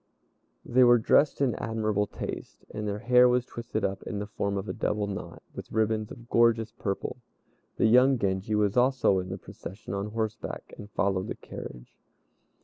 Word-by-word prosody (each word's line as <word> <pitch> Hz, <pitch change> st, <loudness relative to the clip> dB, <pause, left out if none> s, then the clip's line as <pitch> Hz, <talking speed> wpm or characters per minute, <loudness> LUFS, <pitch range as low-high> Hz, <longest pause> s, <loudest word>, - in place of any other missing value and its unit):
They 130 Hz, +1 st, +4 dB
were 120 Hz, 0 st, +7 dB
dressed 140 Hz, +6 st, +3 dB
in 130 Hz, -4 st, +3 dB
admirable 110 Hz, -3 st, -1 dB
taste, -, -, -7 dB
and 105 Hz, 0 st, -3 dB
their 100 Hz, 0 st, -2 dB
hair 125 Hz, +3 st, +5 dB
was 125 Hz, 0 st, +2 dB
twisted 115 Hz, -3 st, -3 dB
up 95 Hz, 0 st, -2 dB
in 105 Hz, -, -5 dB
the 105 Hz, -, -3 dB
form 100 Hz, -1 st, -2 dB
of 100 Hz, +2 st, -4 dB
a -, -, -3 dB
double 105 Hz, 0 st, -1 dB
knot, 100 Hz, -2 st, -7 dB
with -, -, -9 dB
ribbons 110 Hz, -1 st, 0 dB
of 120 Hz, 0 st, -11 dB
gorgeous 115 Hz, -2 st, +3 dB
purple. 100 Hz, -2 st, -4 dB, 0.6 s
The -, -, +3 dB
young 125 Hz, +4 st, +6 dB
Genji 100 Hz, 0 st, -1 dB
was 105 Hz, -1 st, +2 dB
also 125 Hz, -6 st, +3 dB
in 90 Hz, 0 st, -5 dB
the 95 Hz, -, -4 dB
procession 95 Hz, +1 st, -9 dB
on 100 Hz, +1 st, -2 dB
horseback, 110 Hz, 0 st, -4 dB
and 105 Hz, -, -10 dB
followed 95 Hz, -3 st, 0 dB
the -, -, -4 dB
carriage. -, -, -9 dB
110 Hz, 180 wpm, -28 LUFS, 100-120 Hz, 0.6 s, were